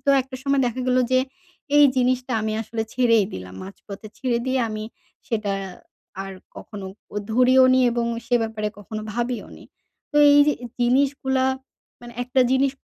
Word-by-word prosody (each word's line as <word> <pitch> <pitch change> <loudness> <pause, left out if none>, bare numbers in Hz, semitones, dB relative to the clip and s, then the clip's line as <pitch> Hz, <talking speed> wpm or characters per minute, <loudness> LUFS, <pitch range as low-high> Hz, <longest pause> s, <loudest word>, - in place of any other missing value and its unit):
তো 280 - +3
একটা 260 0 -9
সময় 275 0 +1
দেখা 245 +1 -3
গেলো 255 0 +3
যে 255 - +5 0.6
এই 295 - +8
জিনিসটা 255 0 +1
আমি 215 0 -2
আসলে 225 +1 -4
ছেড়েই 230 -4 +3
দিলাম 90 0 -8
মাঝপথে 200 +2 -10
ছেড়ে 250 -3 0
দিয়ে 260 0 +1
আমি 215 0 -5 0.4
সেটা 215 -5 -1 0.7
আর 195 0 -7 0.2
কখনো 200 -3 -8 0.3
ও - - -5 0.2
ধরিও 255 +2 +5
নি 260 - +4
এবং 235 0 -1 0.2
সে 245 - +1
ব্যাপারে 220 -1 -3
কখনো 215 +1 -7
ভাবিও 240 +1 -3
নি। - - -14 0.5
তো 295 - -3
এই 285 - +6
য - - +5 0.3
জিনিসগুলা 265 +1 +2 0.6
মানে 240 0 -11
একটা 250 +1 +1
জিনিস 265 +1 +2
245 Hz, 165 wpm, -23 LUFS, 215-260 Hz, 0.7 s, এই